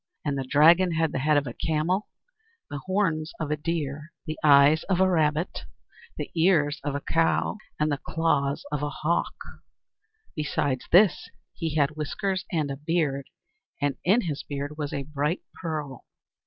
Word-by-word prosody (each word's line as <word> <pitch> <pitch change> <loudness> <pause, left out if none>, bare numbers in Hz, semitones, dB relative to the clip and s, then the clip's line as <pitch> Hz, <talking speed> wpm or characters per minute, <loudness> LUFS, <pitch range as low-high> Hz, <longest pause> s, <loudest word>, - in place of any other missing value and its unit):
And 145 -2 0
the 135 - -2
Dragon 165 +6 +5
had 160 -1 +1
the - - -2
head 150 +2 +3
of 145 - +1
a 120 - -5
camel, 165 - -1 0.6
the 145 - -4
horns 175 -5 0
of 155 -2 -3
a - - +2
deer, 150 -1 -4
the 155 -2 -4
eyes 145 +1 +6
of 185 -2 0
a 190 - +5
rabbit, 160 -1 0 0.5
the - - -5
ears 160 -4 +2
of 140 -1 -2
a 145 - -2
cow, 165 +7 +1 0.2
and 150 0 +1
the 145 - -1
claws 145 -4 0
of 150 -1 -2
a 145 - -1
hawk. 160 +4 -1 1.0
Besides 140 -3 -1
this, 185 +1 +5 0.2
he 160 -3 -3
had 145 -2 +3
whiskers 185 +6 -3
and 155 -5 0
a 135 - -5
beard, 150 -3 -1 0.5
and 145 -1 0
in 205 +7 +4
his 155 -8 -3
beard 145 +1 -5
was 150 -2 -4
a 140 - -3
bright 150 +4 -2
pearl. 150 -6 -5
155 Hz, 170 wpm, -26 LUFS, 145-165 Hz, 1.0 s, eyes